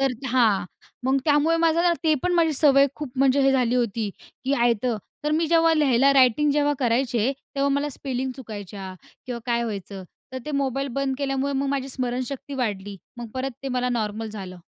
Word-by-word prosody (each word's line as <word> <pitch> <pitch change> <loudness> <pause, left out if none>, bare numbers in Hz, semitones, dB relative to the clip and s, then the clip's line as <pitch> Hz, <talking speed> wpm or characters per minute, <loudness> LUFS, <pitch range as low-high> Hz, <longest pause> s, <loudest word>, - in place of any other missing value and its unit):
तर 270 -1 +2 0.2
हां, 230 -7 +3 0.4
मग 265 +1 +3
त्यामुळे 300 +2 +3
माझं 330 0 +2
ना, 350 -1 +4
ते 310 -1 +4
पण 360 - +1
माझी 330 -2 +3
सवय 275 -1 +5
खूप 295 -4 -6
म्हणजे 270 +1 +4
हे 270 0 +4
झाली 250 -2 +2
होती, 225 -3 0 0.3
की 270 - 0
आयतं 235 -2 +1 0.3
तर 300 - +1
मी 320 +1 +2
जेव्हा 330 -1 +4
लिहायला 275 -2 +4
रायटिंग 265 +2 +4
जेव्हा 290 0 +2
करायचे, 245 -1 +1 0.2
तेव्हा 275 0 +2
मला 285 +1 0
स्पेलिंग 260 -1 -3
चुकायच्या 205 -5 -8 0.3
किंवा 245 -2 -4
काय 235 0 +1
व्हायचं, 200 -3 -6 0.3
तर 260 - -4
ते - - -3
मोबाईल 275 -1 -1
बंद 275 -1 0
केल्यामुळे, 275 0 -1
मग 275 0 -1
माझी 270 -1 -2
स्मरणशक्ती 255 +2 -4
वाढली, 205 -6 -3 0.2
मग 240 -1 -7
परत 260 +1 -2
ते 275 - -3
मला 250 -1 0
नॉर्मल 220 -2 -2
झालं. 190 -4 -8
260 Hz, 185 wpm, -24 LUFS, 235-280 Hz, 0.4 s, सवय